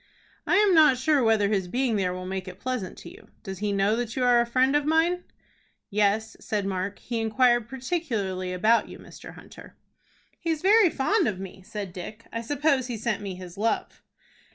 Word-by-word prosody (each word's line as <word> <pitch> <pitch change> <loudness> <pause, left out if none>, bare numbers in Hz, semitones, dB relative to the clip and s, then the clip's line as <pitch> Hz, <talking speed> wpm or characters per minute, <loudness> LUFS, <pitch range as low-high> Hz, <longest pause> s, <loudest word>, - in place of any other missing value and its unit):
"I - - +3
am 410 -2 +5
not 305 -6 +6
sure 275 +1 +2
whether 220 -2 +3
his 195 -3 0
being 245 +3 0
there 190 -3 0
will 185 0 -6
make 190 0 -4
it 185 +1 -9
pleasant 250 -7 -4
to - - -10
you. - - -16 0.2
Does 190 -1 -7
he 210 0 -1
know 200 +2 +2
that 235 -1 -3
you 260 - 0
are 245 -1 +5
a 235 - -1
friend 260 +3 +2
of 295 - +3
mine?" 325 +4 +1 0.7
"Yes," 210 +2 +1
said 205 -2 -2
Mark; 195 +1 -3
"he 235 -1 -4
inquired 240 +1 +2
particularly 230 - -3
about 215 +6 +2
you, - - -9
Mr. - - -12
Hunter." - - -14 0.6
"He's 325 -2 -2
very 410 -1 +6
fond 345 +7 +1
of 190 -3 -2
me," 190 0 -9
said 195 -1 -7
Dick; 210 +5 -8
"I 230 - -2
suppose 275 +1 0
he 240 -3 -4
sent 215 -1 -2
me 195 -2 -5
his 180 +1 -10
love." 225 +2 -1
225 Hz, 200 wpm, -26 LUFS, 195-265 Hz, 0.7 s, not